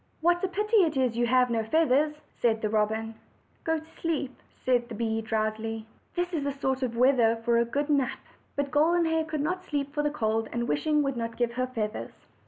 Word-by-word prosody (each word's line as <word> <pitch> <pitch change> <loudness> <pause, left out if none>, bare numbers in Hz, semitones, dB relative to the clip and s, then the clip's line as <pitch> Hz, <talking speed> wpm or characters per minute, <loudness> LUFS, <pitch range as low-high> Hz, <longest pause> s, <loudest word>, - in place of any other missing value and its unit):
"What 350 +2 +2
a - - +3
pity 425 +5 +1
it 325 -8 +3
is 255 -3 +1
you 240 0 +1
have 250 0 +3
no 225 -1 +1
feathers!" 300 +3 +2 0.2
said 225 -2 0
the 215 - +1
robin. 220 +1 0 0.5
"Go 320 0 +1
to 315 - -9
sleep," 315 -5 -3 0.2
said 245 -2 +1
the 225 - -6
bee 225 0 -1
drowsily; 220 0 -2 0.3
"this 355 0 -1
is 310 -4 -1
the 285 - 0
sort 265 -1 -1
of 240 -3 -2
weather 245 -3 +4
for 235 -1 +4
a 235 - +3
good 285 +5 -1
nap." 280 -4 +1 0.4
But 285 -1 -1
Golden 335 +3 +3
Hair 320 0 +1
could 310 -2 -3
not 365 +5 -1
sleep 285 -4 -3
for 295 - 0
the 295 - +1
cold, 225 -5 -1
and 235 0 -2
wishing 300 - +2
would 275 -3 -1
not 230 0 -4
give 240 -1 0
her 255 +1 -1
feathers. 225 -4 -5
255 Hz, 215 wpm, -28 LUFS, 230-305 Hz, 0.5 s, weather